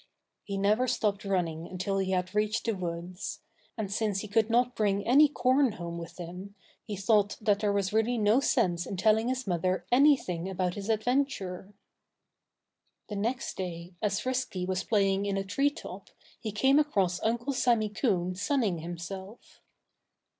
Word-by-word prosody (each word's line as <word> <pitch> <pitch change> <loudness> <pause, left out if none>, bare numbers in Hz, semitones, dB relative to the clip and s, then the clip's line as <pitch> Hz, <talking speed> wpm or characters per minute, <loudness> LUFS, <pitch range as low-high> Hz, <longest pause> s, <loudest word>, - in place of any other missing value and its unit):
He 200 -1 -4
never 210 +6 +2
stopped 210 -4 0
running 170 -4 -1
until 195 +2 -2
he 190 -1 -1
had 180 0 -1
reached 210 +1 0
the 230 - +2
woods. 175 0 -5 0.4
And 200 -3 -3
since 205 -2 0
he 215 - -6
could 220 +2 +2
not 245 +1 +2
bring 200 -2 +1
any 285 +5 +6
corn 260 -2 +2
home 170 -3 -6
with 170 0 -9
him, 180 +3 -8 0.3
he 210 - -5
thought 205 +1 +2
that 205 -2 +2
there 210 -1 +1
was 200 -1 0
really 225 +3 +2
no 215 +3 +4
sense 185 -11 +1
in 195 - -4
telling 220 +4 +3
his 260 0 -2
mother 185 -1 0
anything 245 - +3
about 180 -1 -1
his 200 +2 -6
adventure. 215 -5 -1 1.3
The 210 - -4
next 230 +5 -2
day, 175 -1 -5
as 200 -2 0
Frisky 255 -8 -2
was 185 0 -1
playing 200 -2 +1
in 200 -1 -1
a 195 - -1
tree 275 +9 +1
top, 290 - -10 0.3
he 220 - -4
came 265 +7 +4
across 195 -12 +1
Uncle 235 +5 0
Sammy 235 -4 +2
Coon 190 -5 0
sunning 205 - 0
himself. 180 +5 -8
200 Hz, 165 wpm, -29 LUFS, 185-230 Hz, 1.3 s, any